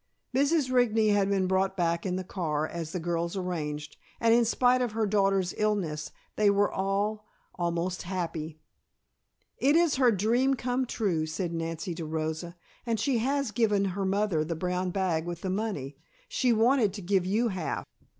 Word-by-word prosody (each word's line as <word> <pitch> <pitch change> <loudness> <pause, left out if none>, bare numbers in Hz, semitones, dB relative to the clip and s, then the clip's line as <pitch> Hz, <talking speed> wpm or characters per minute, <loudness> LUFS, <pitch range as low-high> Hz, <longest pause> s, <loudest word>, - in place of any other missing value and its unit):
Mrs. 285 0 +2
Rigney 225 -4 +3
had 200 -1 +2
been 195 -2 +2
brought 190 +1 +1
back 170 +1 0
in 180 - -1
the 185 - -3
car, 155 -5 -2
as 165 -2 -5
the 180 - -3
girls 170 +2 -2
arranged, 150 -5 -4 0.2
and 230 -1 +4
in 235 0 +4
spite 250 +2 +3
of 240 -4 -1
her 220 0 +1
daughter's 195 -3 +2
illness 175 -8 -1 0.3
they 210 -1 +4
were 200 0 +3
all 205 +2 -1 0.3
almost 175 +1 -2
happy. 165 -4 -4 1.0
"It 285 +3 +4
is 335 -4 +3
her 255 -2 +5
dream 235 +6 +2
come 250 +1 -1
true," 175 -10 -1
said 170 +2 -3
Nancy 165 +2 -3
to 165 -1 -5
Rosa. 160 +2 -3 0.3
"And 230 -3 -1
she 265 -5 +1
has 275 +2 0
just - - -11
given 210 -4 +2
her 200 +1 -2
mother 195 -4 +1
the 165 +2 -3
brown 180 +2 -1
bag 175 -3 -1
with 175 -1 -5
the 190 - -2
money. 190 -10 -3 0.3
She 295 - +1
wanted 230 -2 +3
to 200 -2 -7
give 185 0 +1
you 225 +5 +2
half." 185 -5 -3
195 Hz, 180 wpm, -28 LUFS, 170-225 Hz, 1.0 s, her